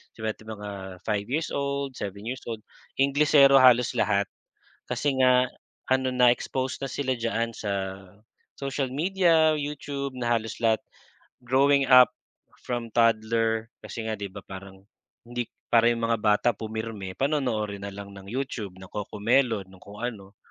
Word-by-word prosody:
seven 110 Hz, -1 st, -3 dB, 0.2 s
mga 105 Hz, 0 st, -7 dB, 0.3 s
five 105 Hz, -2 st, -1 dB
years 155 Hz, +6 st, -1 dB
old, 140 Hz, -1 st, -2 dB
seven 100 Hz, 0 st, -5 dB
years 130 Hz, +3 st, -5 dB
old, 110 Hz, -2 st, -4 dB, 0.4 s
Inglesero 140 Hz, 0 st, +6 dB
halos 125 Hz, -2 st, +6 dB
lahat. 100 Hz, -1 st, +2 dB, 0.6 s
Kasi 145 Hz, -2 st, 0 dB
nga 125 Hz, 0 st, +5 dB, 0.4 s
ano, 130 Hz, 0 st, +2 dB
na-exposed 125 Hz, +2 st, +1 dB
na 135 Hz, -, -3 dB
sila 130 Hz, -2 st, -1 dB
diyan 115 Hz, -1 st, -2 dB
sa 100 Hz, -3 st, -3 dB, 0.6 s
social 135 Hz, -1 st, -2 dB
media, 165 Hz, +1 st, +3 dB
YouTube, 145 Hz, -2 st, -4 dB
na 120 Hz, -, -2 dB
halos 110 Hz, 0 st, -5 dB
lahat 115 Hz, -1 st, +2 dB, 0.6 s
growing 135 Hz, +2 st, +3 dB
up 125 Hz, -1 st, +8 dB, 0.5 s
from 120 Hz, -1 st, -3 dB
toddler 115 Hz, 0 st, +2 dB, 0.2 s
kasi 115 Hz, -, -6 dB
nga 110 Hz, -, -1 dB
'di 100 Hz, -1 st, -4 dB
ba 100 Hz, -, -9 dB
parang 95 Hz, 0 st, -11 dB, 0.4 s
hindi 120 Hz, 0 st, -3 dB, 0.3 s
para 115 Hz, 0 st, +6 dB
'yong 115 Hz, -1 st, -1 dB
mga 115 Hz, 0 st, +1 dB
bata 105 Hz, +2 st, +3 dB
pumirme, 110 Hz, -3 st, -5 dB
panonoorin 120 Hz, -8 st, -1 dB
na -, -, -5 dB
lang 100 Hz, 0 st, -9 dB
ng 95 Hz, 0 st, -12 dB
YouTube, 120 Hz, -6 st, -4 dB
ng 95 Hz, 0 st, -11 dB
Cocomelon, 110 Hz, +1 st, 0 dB
ng 95 Hz, -1 st, -16 dB
kung 100 Hz, +1 st, -12 dB
ano. 100 Hz, -5 st, -6 dB
115 Hz, 145 wpm, -26 LUFS, 105-135 Hz, 0.6 s, up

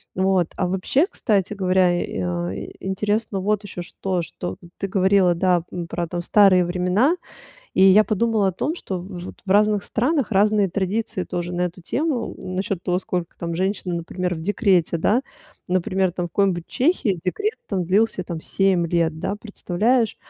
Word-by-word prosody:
Вот, 185 Hz, -2 st, +2 dB
а, 185 Hz, -, +1 dB
вообще, 190 Hz, -, +1 dB
кстати 210 Hz, -, 0 dB
говоря, 185 Hz, -2 st, +3 dB
э, -, -, -4 dB
а, 85 Hz, 0 st, -2 dB
ин 95 Hz, -, -6 dB
интересно 205 Hz, +2 st, -1 dB
вот 210 Hz, +1 st, 0 dB
ещё 185 Hz, -3 st, -6 dB
что, 180 Hz, 0 st, -3 dB
что 175 Hz, -, -6 dB, 0.2 s
ты 195 Hz, -, -2 dB
говорила, 190 Hz, -2 st, +3 dB
да, 175 Hz, -1 st, +2 dB
м, 175 Hz, -1 st, -4 dB
про 170 Hz, 0 st, -3 dB
там 175 Hz, +1 st, -4 dB
старые 190 Hz, -2 st, +5 dB
времена, 180 Hz, -, +2 dB, 0.6 s
и -, -, +4 dB
я 195 Hz, +3 st, +7 dB
подумала 215 Hz, 0 st, +1 dB
о -, -, -1 dB
том, 300 Hz, -, -2 dB
что 190 Hz, -, -4 dB
в 180 Hz, 0 st, -8 dB
вот -, -, -8 dB
в 195 Hz, -, -6 dB
разных 210 Hz, 0 st, +4 dB
странах 265 Hz, +2 st, 0 dB
разные 205 Hz, 0 st, +3 dB
традиции 200 Hz, +1 st, -2 dB
тоже 175 Hz, -1 st, -4 dB
на 175 Hz, 0 st, -1 dB
эту 180 Hz, +1 st, -3 dB
тему, 270 Hz, -, -2 dB
насчет 185 Hz, 0 st, -3 dB
того, 180 Hz, 0 st, +1 dB
сколько 180 Hz, -2 st, -4 dB
там 170 Hz, -1 st, -4 dB
женщины, 190 Hz, -1 st, -1 dB
например, 180 Hz, +1 st, -3 dB
в 160 Hz, -, -7 dB
декрете, 185 Hz, -4 st, +2 dB
да. 230 Hz, +10 st, +2 dB, 0.5 s
Например, 185 Hz, 0 st, +1 dB
там 175 Hz, -1 st, -3 dB
в -, -, -10 dB
какой-нибудь 175 Hz, -1 st, 0 dB
Чехии 250 Hz, -, +1 dB
декрет 415 Hz, -, -1 dB
там 190 Hz, -3 st, -1 dB
длился 195 Hz, +2 st, +2 dB
там 170 Hz, -2 st, -5 dB
7 185 Hz, -1 st, +1 dB
лет, 165 Hz, -2 st, 0 dB
да 200 Hz, -, -2 dB
представляешь? 220 Hz, +3 st, 0 dB
190 Hz, 175 wpm, -22 LUFS, 175-210 Hz, 0.6 s, я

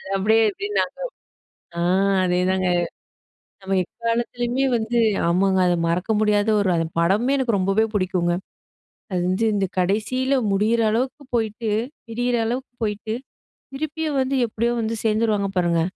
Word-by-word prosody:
அப்படியே 215 Hz, +3 st, +3 dB
எப்படி 400 Hz, -, -5 dB
நாங்க -, -, -2 dB, 0.8 s
ஆ -, -, 0 dB, 0.4 s
அதே 180 Hz, 0 st, +1 dB
தாங்க. 185 Hz, 0 st, +1 dB, 1.0 s
நம்ம 195 Hz, 0 st, -1 dB
எக்காலத்திலேயுமே 240 Hz, +4 st, -2 dB
வந்து 230 Hz, +1 st, -1 dB, 0.3 s
ஆமாங்க, 190 Hz, +2 st, +2 dB
அது 175 Hz, -, +3 dB
மறக்க 175 Hz, +5 st, -1 dB
முடியாத 210 Hz, 0 st, +2 dB
ஒரு 200 Hz, -, +1 dB
அது 165 Hz, -, +1 dB, 0.2 s
படமுமே 210 Hz, +10 st, +2 dB
எனக்கு 245 Hz, -5 st, +1 dB
ரொம்பவே 195 Hz, +4 st, +2 dB
புடிக்கும்ங்க. 180 Hz, -3 st, +1 dB, 0.8 s
அது 180 Hz, -, 0 dB
வந்து 190 Hz, +5 st, +1 dB
இந்த 200 Hz, -1 st, +1 dB
கடைசியில 220 Hz, +8 st, +1 dB, 0.2 s
முடியற 215 Hz, +4 st, +2 dB
அளவுக்கு 255 Hz, +6 st, -1 dB
போயிட்டு 220 Hz, -1 st, -1 dB, 0.4 s
பிரியிற 245 Hz, +2 st, 0 dB
அளவுக்கு 250 Hz, +2 st, -3 dB
போயிட்டு, 210 Hz, +1 st, -3 dB, 0.6 s
திருப்பியும் 310 Hz, 0 st, -2 dB
வந்து 260 Hz, +1 st, 0 dB
எப்படியோ 230 Hz, +2 st, -1 dB
வந்து 225 Hz, +1 st, -2 dB
சேர்ந்துருவாங்க 215 Hz, -2 st, +1 dB
பாருங்க. 170 Hz, -2 st, +2 dB
220 Hz, 130 wpm, -22 LUFS, 190-240 Hz, 1.0 s, அப்படியே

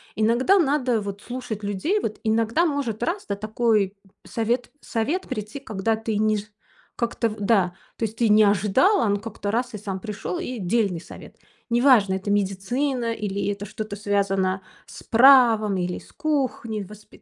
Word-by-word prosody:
Иногда 235 Hz, -, +3 dB
надо, 270 Hz, -, +2 dB
вот, 200 Hz, 0 st, -6 dB
слушать 245 Hz, -4 st, -6 dB
людей, 205 Hz, -, 0 dB
вот, 215 Hz, -, -4 dB
иногда 225 Hz, +8 st, +2 dB
может, 280 Hz, -9 st, -2 dB
раз, 370 Hz, +4 st, -2 dB
да, 200 Hz, -, -1 dB
такой 215 Hz, -1 st, 0 dB, 0.3 s
совет 235 Hz, +2 st, -1 dB
совет 285 Hz, +12 st, -1 dB
прийти, 215 Hz, +1 st, -5 dB
когда 220 Hz, -4 st, -1 dB
ты 220 Hz, -1 st, -3 dB
не 215 Hz, 0 st, +2 dB
жд 205 Hz, +1 st, -8 dB, 0.4 s
как-то 235 Hz, -1 st, -1 dB
в 215 Hz, -, -8 dB
да. 195 Hz, -4 st, +2 dB, 0.2 s
То 230 Hz, -, 0 dB
есть 220 Hz, +1 st, -6 dB
ты 230 Hz, -1 st, +2 dB
не 215 Hz, +1 st, +6 dB
ожидала, 210 Hz, -, +3 dB
а -, -, +2 dB
он 205 Hz, 0 st, +2 dB
как-то 210 Hz, -1 st, -5 dB
раз- 245 Hz, +2 st, -1 dB
и -, -, -4 dB
сам 195 Hz, -2 st, -5 dB
пришел, 220 Hz, -, -5 dB
и 255 Hz, -9 st, -5 dB
дельный 195 Hz, -2 st, 0 dB
совет. -, -, -12 dB, 0.3 s
Неважно, 235 Hz, -5 st, +4 dB
это 190 Hz, +2 st, -3 dB
медицина, 230 Hz, +6 st, 0 dB
или 200 Hz, -2 st, -3 dB
это 205 Hz, 0 st, -5 dB
что-то 215 Hz, 0 st, -6 dB
связано 195 Hz, -2 st, 0 dB, 0.3 s
с -, -, -11 dB
правом, 230 Hz, -5 st, +6 dB
или 180 Hz, 0 st, -2 dB
с -, -, -18 dB
кухней. 260 Hz, -8 st, -2 dB
Воспи 210 Hz, +2 st, -15 dB
220 Hz, 170 wpm, -24 LUFS, 200-245 Hz, 0.4 s, не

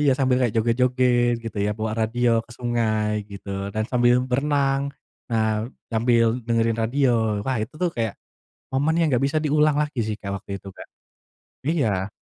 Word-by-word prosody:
Iya 145 Hz, -2 st, +4 dB
sambil 130 Hz, -2 st, +3 dB
kayak 120 Hz, -, +1 dB
joget-joget 120 Hz, +1 st, +2 dB
gitu 110 Hz, -2 st, -6 dB
ya, 105 Hz, -, +1 dB
bawa 110 Hz, 0 st, -2 dB
radio 115 Hz, 0 st, +2 dB
ke -, -, -24 dB
sungai 110 Hz, -3 st, -1 dB
gitu, 100 Hz, 0 st, -10 dB, 0.2 s
dan 110 Hz, +1 st, -1 dB
sambil 120 Hz, 0 st, +3 dB
berenang. 140 Hz, +1 st, +1 dB, 0.4 s
Nah 110 Hz, -1 st, +2 dB, 0.4 s
sambil 115 Hz, 0 st, +2 dB
dengerin 115 Hz, -1 st, +1 dB
radio. 115 Hz, -4 st, +1 dB
Wah 130 Hz, -2 st, 0 dB
itu 110 Hz, -, -6 dB
tuh 180 Hz, -, +2 dB
kayak 115 Hz, -3 st, -1 dB, 0.6 s
momen 145 Hz, +4 st, +2 dB
yang 165 Hz, -, +3 dB
enggak 125 Hz, -, +2 dB
bisa 155 Hz, +3 st, 0 dB
diulang 150 Hz, 0 st, +3 dB
lagi 150 Hz, -4 st, -1 dB
sih 110 Hz, -, -2 dB
Kak, 100 Hz, -1 st, -5 dB
waktu -, -, -15 dB
itu 100 Hz, -, -11 dB
Kak. -, -, -11 dB, 0.8 s
Iya. 110 Hz, -, +1 dB
120 Hz, 165 wpm, -23 LUFS, 110-135 Hz, 0.8 s, Iya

